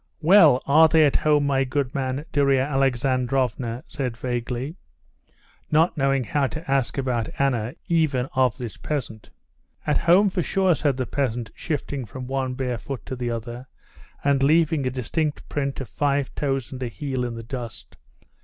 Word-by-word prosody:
"Well, 160 -7 +6
are 155 +3 +6
they 160 -1 +5
at 140 - +3
home, 150 -1 +2
my 135 -1 +2
good 135 -1 -2
man?" 135 +2 -2
Darya 140 -2 +3
Alexandrovna 130 -2 0
said 130 -5 -4
vaguely, 125 +3 -3 1.0
not 160 +3 +3
knowing 135 -2 +1
how 140 +3 0
to 155 0 -6
ask 135 -2 +1
about 125 -4 -1
Anna, 125 -4 0
even 155 -7 +1
of 130 -2 +2
this 120 -5 -6
peasant. 120 -8 -5 0.6
"At 150 - +2
home 190 +4 +4
for 185 - 0
sure," 190 +1 +2
said 145 -4 0
the 130 - -1
peasant, 120 -5 -2
shifting 145 -4 -4
from 125 +3 -8
one 130 0 -2
bare 125 -3 -2
foot 135 +1 -7
to 130 - -5
the 120 -1 -3
other, 120 +2 -5 0.6
and 140 -1 +2
leaving 155 -1 +3
a - - +2
distinct 145 +5 -2
print 140 -2 -2
of 130 - -6
five 140 -2 -1
toes 135 -4 -2
and 130 -1 -7
a 125 - -1
heel 130 +1 -3
in 120 -1 -3
the 115 - -7
dust. 120 -1 -8
135 Hz, 170 wpm, -24 LUFS, 125-145 Hz, 1.0 s, Well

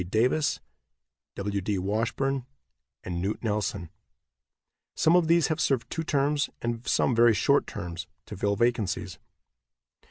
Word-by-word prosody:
Davis, 130 +9 +1 0.8
W. 100 0 -2
D. 100 +1 -1
Washburn 115 +7 -1 0.6
and 85 -1 -4
Knute 100 +5 -3
Nelson. 100 -6 -2 1.0
Some 160 +2 +4
of 175 -3 +4
these 170 -2 +4
have 155 - -1
served 120 -4 0
two 165 - -2
terms, 145 0 +1
and 120 0 -3
some 130 - +2
very 115 -1 +5
short 140 +8 +3
terms, 85 -1 -6 0.2
to - - -8
fill 100 +2 0
vacancies. 105 -6 -1
115 Hz, 130 wpm, -27 LUFS, 100-140 Hz, 1.0 s, very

